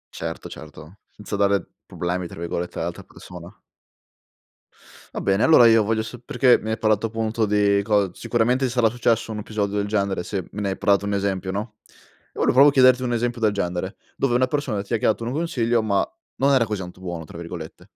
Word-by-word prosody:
Certo, 80 0 -5
certo, 80 +4 -12
senza 105 0 -7
dare 100 -1 +1 0.2
problemi 90 0 -3
tra - - -12
virgolette 85 +1 -4
all'altra - - -4
persona. 90 -1 -13 1.6
Va - - -3
bene, 100 +2 +1
allora 125 -7 +7
io 115 -1 +5
voglio 110 +1 0
sol 120 +2 -9
perché 125 -2 +4
mi 110 - -4
hai 110 - -1
parlato 110 0 +2
appunto 110 0 -1
di 100 -1 +2
cos 105 -3 +2
sicuramente 125 +3 +1
ti 125 - -1
sarà 120 -3 +3
successo 115 -1 0
un 105 - -5
episodio 105 -1 -3
del 100 - 0
genere. 100 -3 -1
Se 95 -4 -4
me 105 - -4
ne 100 - -1
hai 95 - -2
prato 100 0 +2
un 100 - -2
esempio, 95 -2 -1
no? 105 +2 -5 0.6
Io - - -5
volevo - - +4
proprio 140 +3 +7
chiederti 130 -2 +5
un 120 -1 -1
esempio 120 0 -1
del 110 -2 +2
genere, 90 0 -3 0.2
dove 135 -3 +1
una 130 +1 +3
persona 135 -8 -2
ti 105 +3 -3
ha - - +2
chiato 110 +2 0
un 120 - -3
consiglio, 120 -8 0
ma 100 -2 +1 0.3
non 140 +1 +3
era 125 -3 +4
così 105 -3 -4
tanto 90 0 -9
buono, 85 -3 -6
tra 85 - -11
virgolette. 85 -1 -9
105 Hz, 205 wpm, -23 LUFS, 95-120 Hz, 1.6 s, allora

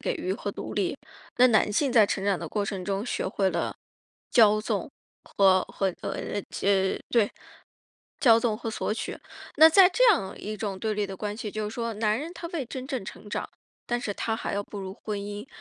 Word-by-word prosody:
给 - - -1
予 365 0 -2
和 - - -4
独 - - -7
立， - - 0 0.4
那 250 - +7
男 215 -2 +3
性 270 +3 +1
在 215 -4 +6
成 195 - -2
长 200 -3 +1
的 - - -6
过 205 -1 -1
程 195 -2 -4
中 195 +2 -2
学 - - -2
会 190 0 +1
了 170 -1 -2 0.6
骄 215 -3 +6
纵 - - -2 0.3
和 190 -2 +4
和 190 -2 -2
呃， 205 - -3
这 190 -1 +1
对， 225 -4 +3 0.9
骄 230 -4 +7
纵 225 -2 0
和 225 0 -4
索 215 - -2
取。 - - -5 0.4
那 320 +2 +9
在 365 +3 +7
这 - - +2
样 190 - -3
一 215 +1 -5
种 200 -3 -4
对 215 +2 -1
立 210 -1 -1
的 195 -1 -7
关 210 +1 -4
系， 215 -2 -5
就 215 0 -3
是 220 - -8
说 230 -1 -3
男 215 +1 +1
人 320 +4 -6
他 350 - -7
未 335 -6 -3
真 255 +2 -7
正 255 -8 -3
成 210 +1 -10
长， - - -3 0.4
但 240 0 -1
是 210 -4 -3
他 225 - -1
还 220 - -3
要 205 - -1
步 205 - -9
入 190 -1 -6
婚 210 -1 -5
姻， 205 +3 -6
215 Hz, 235 characters per minute, -27 LUFS, 200-240 Hz, 0.9 s, 那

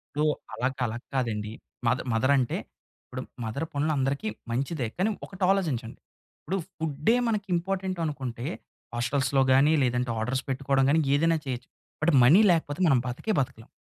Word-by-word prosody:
So, 150 - +1 0.3
అల‌గా 130 +1 -2
అలా 115 +2 -4 0.2
కాదండి. 110 -5 -1 0.4
మద్ 125 +2 +2
మదర్ 130 +5 +3
అంటే 125 -2 0 0.5
ఇపుడు 130 0 -6 0.2
మదర్ 115 +8 -3
పనులు 150 +2 +1
అందరికీ 135 +9 0 0.2
మంచిదే. 130 +1 -1
కానీ 195 +4 +2 0.2
ఒకటాలోచించండి. 180 - -1 0.4
ఇప్పుడు 190 +5 -2 0.2
ఫు‌డే 155 +7 +1
మనకి 210 -3 -1
ఇంపార్టెంట్ 185 0 -2
అనుకుంటే 130 -5 -4 0.5
హోస్టెల్స్‌లో 135 +2 +1
కానీ 135 +4 +5
లేదంటే 125 -1 0
ఆర్డర్స్ 125 +4 -1
పెట్టుకోవడం 135 0 +1
కానీ 160 +3 +4
ఏదైనా 165 +3 +3
చేయొచ్చు. 125 -1 -4 0.3
బట్ 165 +2 +3
మనీ 165 - +7
లేకపోతే 160 -2 0
మనం 135 -4 +5
బతికే 170 - -2
బతకలేం. 130 -4 -4
135 Hz, 145 wpm, -27 LUFS, 125-165 Hz, 0.5 s, మనీ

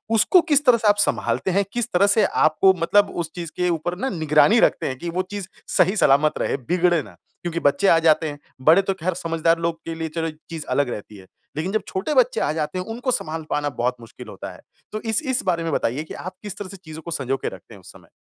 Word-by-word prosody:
उसको 225 - +5
किस 290 0 +4
तरह 250 -3 +6
से 220 -2 -1
आप 205 - +6
सँभालते 200 -1 0
हैं, 200 +2 +2
किस 240 -1 -1
तरह 195 +3 +4
से 215 +2 +4
आपको 175 +5 +3
मतलब 205 +4 +3
उस 160 - -9
चीज़ 170 -3 -6
के 180 0 0
ऊपर 170 +1 -2
ना 265 +6 -2
निगरानी 160 +6 +3
रखते - - +2
हैं 130 -1 -4
कि 170 - -4
वो 180 +2 -1
चीज़ 200 -3 -5 0.3
सही 190 +4 +4
सलामत 145 0 +3
रहे, - - 0
बिगड़े 175 +4 +1
ना। 100 -6 -15 0.3
क्योंकि 170 -1 -3
बच्चे 155 +7 +2
आ 165 - +6
जाते 160 -1 +3
हैं, 145 0 -8 0.2
बड़े 160 +8 +6
तो 195 0 -1
खैर 185 +3 0
समझदार 165 -1 0
लोग 165 -1 -2
के 165 0 -4
लिए 160 0 -3
चलो 165 -1 -1
ये 155 -1 -8
चीज़ 160 -3 -6
अलग 145 -3 +1
रहती 105 -2 -7
है, 95 -1 -15 0.3
लेकिन 160 +6 -2
जब 215 - 0
छोटे 195 +11 -2
बच्चे 255 -3 +3
आ - - +1
जाते 155 +3 -3
हैं 180 - -4
उनको 245 +3 -3
सँभाल 160 -6 -3
पाना 145 0 0
बहुत 125 +1 +1
मुश्किल 115 - -12
होता - - -8
है। - - -16 0.3
तो 215 - -4
इस 225 +1 -1
इस 260 - 0
बारे 170 -2 0
में 165 - -2
बताइए 130 +7 -1
कि 155 - -10
आप 185 - -7
किस 205 -1 -7
तरह 200 -2 -7
से 195 - -10
चीज़ों 160 -3 -10
को 170 +2 -8
संजो 135 -2 -1
के - - -5
रखते - - -13
हैं - - -14
उस - - -14
समय? - - -18
170 Hz, 260 wpm, -22 LUFS, 155-200 Hz, 0.3 s, तरह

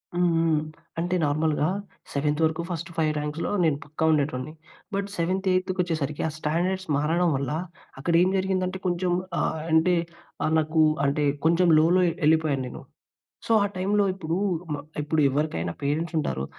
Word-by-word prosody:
హ్మ్, 175 0 +3 0.2
హ్మ్. 155 -2 +2 0.4
అంటే 175 +2 0
నార్మల్‌గా 150 +1 +1 0.5
సెవెంత్ 150 +2 0
వరకు 160 +1 +1
ఫస్ట్ 170 0 -4
5 155 -1 +2
ర్యాంక్స్‌లో 150 +5 -3
నేను 155 -4 +2
పక్కా 155 +2 -3
ఉండేటోన్ని. 145 -1 -1 0.4
బట్, 200 0 -1
సెవెంత్ 185 +3 -1
ఎయిత్కొచ్చేసరికి, 180 -6 -1
ఆ - - -1
స్టాండర్డ్స్ 175 +5 -1
మారడం 165 +4 +2
వల్ల, 135 0 -2 0.5
అక్కడ 170 +5 -1
ఏం 185 - +4
జరిగిందంటే 185 0 -1
కొంచెం 175 0 0 0.3
ఆహ్, 160 - -1
అంటే 165 +3 +4 0.5
ఆహ్, 155 - +1
నాకు 155 +1 +1 0.2
అంటే 145 +1 +1 0.2
కొంచెం 170 +2 +4
లోలో 175 +4 +4 0.3
ఎళ్ళిపోయాను 155 -4 +2
నేను. - - -8 0.7
సో, - - +3
ఆ - - +2
టైంలో 200 +2 +2
ఇప్పుడు, 170 -2 -2 0.3
మ - - -1 0.3
ఇప్పుడెవ్వరికైనా 145 - 0
పేరెంట్స్ 155 +5 -1
ఉంటారు. 65 - -2
160 Hz, 145 wpm, -25 LUFS, 150-180 Hz, 0.7 s, ఏం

